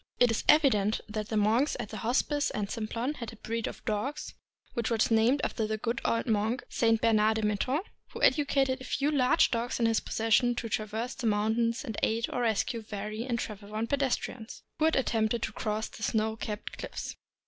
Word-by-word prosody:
It 245 -2 +5
is 225 - -1
evident 220 -9 +5
that 215 0 -4
the 220 - 0
monks 225 +8 +2
at 225 -4 -5
Hos 225 +4 +1
pice 290 -1 0
and 205 -1 -3
Simplon 230 +4 -2
had 235 -2 -6
a - - -12
breed 230 +1 -3
of - - -8
dogs 215 +7 -2 0.4
which 235 -2 -1
was 230 -1 +1
named 225 +5 +4
after 220 -2 -1
the 215 0 -1
good 230 +2 -2
old 230 - +1
monk, 220 +1 0
St. 225 -1 +2
Bernard 220 -1 +3
de 220 - -1
Menthon, 210 - +1 0.3
who - - -8
educated 275 -3 +3
a - - -7
few 280 +3 0
large 285 +3 +4
dogs 235 +1 -1
in 235 - +3
his 225 -1 +3
possession 225 +2 +2
to 235 - -3
traverse 220 +4 -2
the 245 - -3
mountains 225 +4 +1
and 225 -5 -5
aid 230 +1 +1
or 245 - -1
rescue 225 0 0
weary 215 +3 -4
and 240 -3 -1
travel 210 -3 -6
worn 215 +2 -2
pedestrians 255 -3 -2 0.2
who 310 - +3
had 320 - +3
attempted 230 -3 +1
to - - -2
cross 215 +1 -2
the - - -13
snow 220 0 0
capped 210 -1 -6
cliffs. - - -5
225 Hz, 205 wpm, -29 LUFS, 215-245 Hz, 0.4 s, It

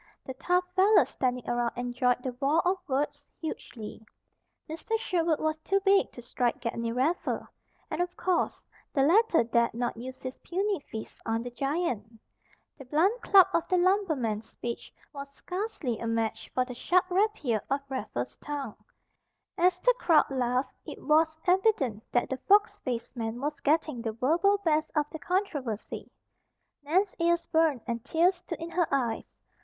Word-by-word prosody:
The 260 - -5
tough 360 +7 +1
fellows 395 +3 +5
standing 250 -2 -2
around 240 -1 0
enjoyed 245 0 0
the 255 - -3
war 310 +6 +3
of 375 +1 +2
words 285 +1 -1 0.2
hugely. 225 -9 -7 0.6
Mr. 330 +8 -2
Sherwood 340 -7 0
was 310 0 -1
too 390 +5 +1
big 390 0 +3
to 245 - -10
strike 240 0 -1
Gedney 230 -1 -2
Raffer, 270 +9 0 0.4
and - - -1
of 355 0 -3
course 365 -2 0 0.3
the 270 - +4
latter 355 - +4
dared 235 0 +1
not 240 0 -1
use 255 +3 -8
his 255 0 -6
puny 390 +2 -1
fists 220 - -7
on 225 +1 -1
the 245 - -6
giant. 245 - -2 0.6
The 275 - -9
blunt 355 - +2
club 390 -3 +7
of 335 - +1
the 365 - +2
lumberman's 315 - +1
speech 235 0 -6 0.2
was 280 -1 -7
scarcely 360 - -3
a 230 - -3
match 225 -1 -1
for 255 - +2
the 250 - -7
sharp 360 +9 +2
rapier 360 - +1
of 275 +1 0
Raffer's 205 - -4
tongue. 280 -6 -6 0.7
As 360 +1 +3
the - - +5
crowd 320 -4 +4
laughed 255 0 0
it - - -8
was 315 +1 +3
evident 355 - +2
that 245 - +2
the 265 - -3
fox 410 - +4
faced 240 -1 -4
man 225 0 -3
was 295 +3 -3
getting 305 -4 +1
the 225 -2 -3
verbal 330 - +3
best 310 -1 +2
of 300 -1 +3
the 315 - -6
controversy. 300 - -3 0.7
Nan's 365 +7 +1
ears 340 0 +2
burned 320 -6 +2
and 235 -2 -3
tears 345 +3 +3
stood 350 -1 -7
in 335 +1 -6
her 350 -1 +1
eyes. 245 -5 -1
290 Hz, 165 wpm, -29 LUFS, 245-355 Hz, 0.7 s, club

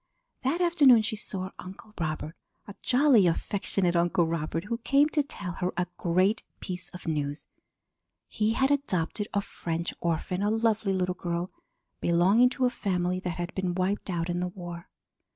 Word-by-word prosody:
That 280 +7 0
afternoon 285 -10 +6
she 220 +1 -1
saw 190 -3 -3
Uncle 195 +4 -10
Robert 155 -1 -3 0.3
a 205 - -8
jolly, 250 -7 +5
affectionate 180 +1 0
Uncle 170 0 +3
Robert 165 0 -2
who 230 +3 -3
came 275 +5 +4
to 305 - +2
tell 200 -10 -5
her 180 +1 -2
a 180 - +1
great 185 +5 +2 0.2
piece 180 -1 -6
of 180 - -11
news. 145 -2 -2 0.8
He 215 +1 0
had 265 +3 +2
adopted 210 - 0
a 200 - +1
French 170 -3 -4
orphan, 170 +2 -1
a 205 - +2
lovely 220 -2 +1
little 180 -1 0
girl 175 0 -3 0.5
belonging 190 +9 +4
to 255 0 0
a 250 - +2
family 180 -5 -1
that 180 -2 -4
had 175 -1 -4
been 185 -2 -2
wiped 190 +3 -1
out 170 -2 -1
in 175 0 -1
the 180 - -1
war. 175 -2 -8
185 Hz, 170 wpm, -28 LUFS, 175-220 Hz, 0.8 s, afternoon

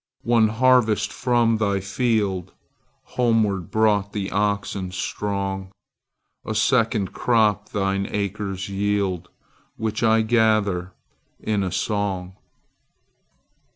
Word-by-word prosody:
One 115 -1 +4
harvest 115 -1 +3
from 120 -2 +2
thy 100 -2 +1
fieldHomeward 105 0 -2
brought 105 -2 +1
the 100 -2 -3
oxen 100 -2 -1
strong;A 95 +2 -6
second 110 -3 +1
crop 110 -3 +2
thine 100 0 -1
acres 100 -2 -3
yield, 100 -3 -1 0.5
Which 110 -1 -2
I 110 -1 +4
gather 110 -5 +1 0.5
in 105 -2 -1
a 95 -2 -2
song. 95 -4 -2
105 Hz, 85 wpm, -23 LUFS, 95-110 Hz, 0.5 s, One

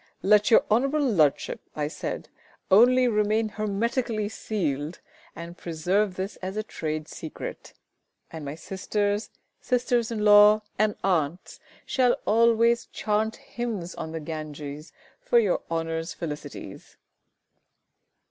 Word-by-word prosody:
"Let 210 +1 +5
your 230 - +7
Hon'ble 270 +7 +2
Ludship," 190 - +2 0.2
I 150 -1 -1
said, 155 - -5 0.4
"only 250 +5 +6
remain 215 0 +1
hermetically 215 +1 -1
sealed, 160 -8 -3 0.4
and 170 +1 -8
preserve 180 +4 0
this 190 +2 -4
as 190 +2 -6
a 215 - -1
trade 155 -6 -4
secret, 160 -1 -8 0.6
and 160 -2 -7
my 140 +1 -5
sisters, 205 +4 -2 0.3
sisters 245 -2 0
in 215 -2 -2
law, 210 +1 +7 0.2
and 215 -1 +2
aunts 175 -2 -1 0.3
shall 255 -3 +2
always 230 +1 +3
chant 220 +1 -1
hymns 215 -8 -5
on 160 - -6
the 160 - -4
Ganges 150 -1 -7 0.3
for 240 - +2
your 210 -6 +3
Honour's 165 0 -3
felicities!" 150 -4 -8
205 Hz, 120 wpm, -26 LUFS, 165-225 Hz, 0.6 s, your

